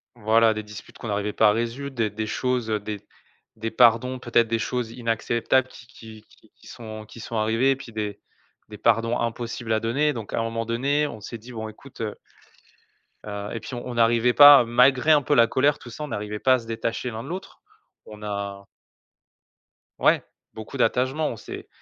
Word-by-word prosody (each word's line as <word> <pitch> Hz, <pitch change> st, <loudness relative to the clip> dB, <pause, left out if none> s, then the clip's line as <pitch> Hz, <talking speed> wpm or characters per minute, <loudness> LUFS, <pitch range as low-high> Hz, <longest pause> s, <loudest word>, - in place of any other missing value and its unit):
Voilà 110 Hz, 0 st, +3 dB
des 110 Hz, 0 st, -5 dB
disputes 105 Hz, 0 st, -12 dB
qu'on -, -, -7 dB
n'arrivait 105 Hz, 0 st, -2 dB
pas 110 Hz, -2 st, +5 dB
à -, -, +5 dB
résoudre, 120 Hz, +5 st, -3 dB
des 115 Hz, -3 st, 0 dB
des 110 Hz, +1 st, -4 dB
choses, 125 Hz, 0 st, -1 dB
heu, 110 Hz, -1 st, 0 dB
des 105 Hz, 0 st, -6 dB, 0.6 s
des 110 Hz, 0 st, -4 dB
pardons 125 Hz, +2 st, +4 dB
peut-être, 120 Hz, -1 st, +2 dB
des 115 Hz, 0 st, -1 dB
choses 120 Hz, 0 st, -2 dB
inacceptables 120 Hz, +2 st, 0 dB
qui 120 Hz, -, -14 dB
qui 110 Hz, -4 st, -13 dB
qui -, -, -25 dB
qui -, -, -19 dB
sont 110 Hz, -2 st, -9 dB
qui 115 Hz, -, -13 dB
sont 115 Hz, -, -7 dB
arrivées 115 Hz, +5 st, +2 dB
et -, -, +2 dB
puis 130 Hz, -3 st, -11 dB
des 105 Hz, -2 st, -4 dB, 0.5 s
des 105 Hz, -, -9 dB
pardons 115 Hz, +2 st, +2 dB
impossibles 115 Hz, 0 st, -4 dB
à 110 Hz, -, +2 dB
donner. 140 Hz, +7 st, +1 dB
Donc 115 Hz, -5 st, -7 dB
à -, -, 0 dB
un 115 Hz, -, 0 dB
moment 115 Hz, 0 st, -3 dB
donné 140 Hz, +6 st, 0 dB
on 125 Hz, -7 st, -9 dB
s'est 115 Hz, +3 st, -7 dB
dit: 120 Hz, +3 st, -13 dB
«Bon 110 Hz, -2 st, -5 dB
écoute» 120 Hz, +4 st, -13 dB
heu 105 Hz, -2 st, -3 dB, 1.1 s
heu 100 Hz, 0 st, -5 dB
et -, -, -3 dB
puis -, -, -9 dB
on 120 Hz, -, -6 dB
on 125 Hz, -, -5 dB
n'arrivait 115 Hz, +1 st, +3 dB
pas 145 Hz, -1 st, +10 dB
malgré 125 Hz, +5 st, +4 dB
un 150 Hz, -2 st, +6 dB
peu 145 Hz, +2 st, +1 dB
la 115 Hz, -2 st, +6 dB
colère 140 Hz, +4 st, +2 dB
tout 120 Hz, -, -11 dB
ça, 135 Hz, +6 st, -7 dB
on -, -, -4 dB
n'arrivait 105 Hz, -4 st, -4 dB
pas 130 Hz, -, +4 dB
à 130 Hz, -, +3 dB
se 115 Hz, -, -13 dB
détacher 115 Hz, +2 st, -3 dB
l'un 110 Hz, 0 st, -6 dB
de 135 Hz, -, -9 dB
l'autre, 190 Hz, +3 st, -7 dB, 0.5 s
on 105 Hz, -1 st, -12 dB
a 100 Hz, -1 st, -5 dB, 1.3 s
Ouais, -, -, +3 dB, 0.3 s
beaucoup 110 Hz, +5 st, -8 dB
d'attachement, 130 Hz, +5 st, +1 dB
on -, -, -4 dB
s'est -, -, -9 dB
115 Hz, 210 wpm, -24 LUFS, 110-125 Hz, 1.3 s, pas